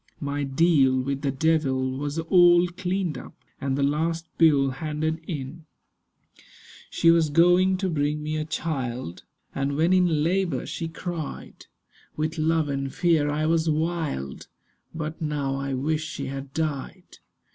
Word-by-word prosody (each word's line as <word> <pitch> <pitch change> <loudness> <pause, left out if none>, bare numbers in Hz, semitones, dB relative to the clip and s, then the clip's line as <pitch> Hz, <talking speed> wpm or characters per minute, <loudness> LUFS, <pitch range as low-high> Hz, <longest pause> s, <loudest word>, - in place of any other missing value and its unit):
My 145 0 -3
deal 135 -2 +3
with 135 +1 -2
the 140 - 0
devil 135 -2 +1
was 145 +3 -4
all 175 +1 +5
cleaned 180 -1 -2
up, - - -12 0.3
And 135 0 -1
the 140 - +1
last 165 +4 0
bill 145 -5 +5
handed 155 +3 -3
in. 155 +1 -6 1.2
She 165 - +4
was 165 -2 +3
going 175 +4 +4
to 190 0 -1
bring 150 -2 -1
me 155 +1 -2
a 155 - -1
child, 130 - -4 0.3
And 140 +1 -1
when 165 +4 +3
in 175 -5 +3
labour 185 +2 0
she 165 - -4
cried 165 -1 -7 0.5
With 155 +1 -2
love 160 0 +2
and 135 -1 -3
fear 165 -4 +2
I 150 +1 0
was 165 0 +2
wild— 155 - -2 0.4
But 160 0 -5
now 145 -3 -1
I 140 -1 -2
wish 155 +4 -1
she 160 -3 -5
had 135 0 -6
died. 150 -3 -4
155 Hz, 145 wpm, -25 LUFS, 140-165 Hz, 1.2 s, all